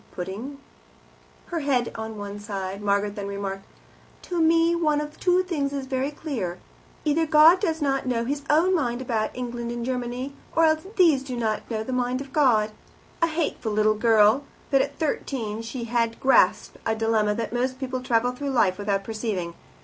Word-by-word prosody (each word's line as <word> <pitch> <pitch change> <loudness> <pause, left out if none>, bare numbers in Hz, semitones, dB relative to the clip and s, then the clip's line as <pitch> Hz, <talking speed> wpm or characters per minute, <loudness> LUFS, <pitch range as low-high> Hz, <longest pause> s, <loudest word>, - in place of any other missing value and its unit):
Putting 205 +10 -5 0.9
her 340 - -2
head 265 -5 0
on 220 -1 -6
one 205 0 -6
side, 195 -1 -5
Margaret 200 0 +1
then 200 -2 -4
remarked, 195 -1 -4 0.6
"To 350 -2 -2
me 330 +1 +4
one 310 -3 +2
of 300 0 -6
two 365 0 +3
things 290 -6 -2
is 275 -2 -3
very 265 +1 -1
clear; 250 - -4 0.5
either 315 +2 +2
God 310 +4 +7
does 325 -6 -1
not 270 -2 0
know 235 -2 0
his 285 +3 -2
own 330 +5 +4
mind 245 -8 0
about 225 -4 -1
England 240 -1 -4
and 240 0 -4
Germany, 250 +1 -3 0.2
or 330 - +5
else 315 +3 +1
these 325 -8 +5
do 260 -2 -5
not 220 -2 -2
know 220 -2 -2
the 255 - -4
mind 250 0 0
of 275 0 -9
God." 225 -8 +3 0.5
A 335 - +4
hateful 310 -9 -2
little 215 0 +3
girl, 220 +3 +4 0.3
but 275 -1 +5
at - - -3
thirteen 230 -8 -2
she 235 +2 -5
had 230 -1 -1
grasped 265 0 +3
a 225 - 0
dilemma 220 -2 +1
that 230 +1 -3
most 255 +1 -1
people 255 -1 -3
travel 245 -1 +1
through 280 +3 -4
life 205 -8 +2
without 200 -1 -1
perceiving. 215 -6 -3
245 Hz, 180 wpm, -25 LUFS, 215-290 Hz, 0.9 s, God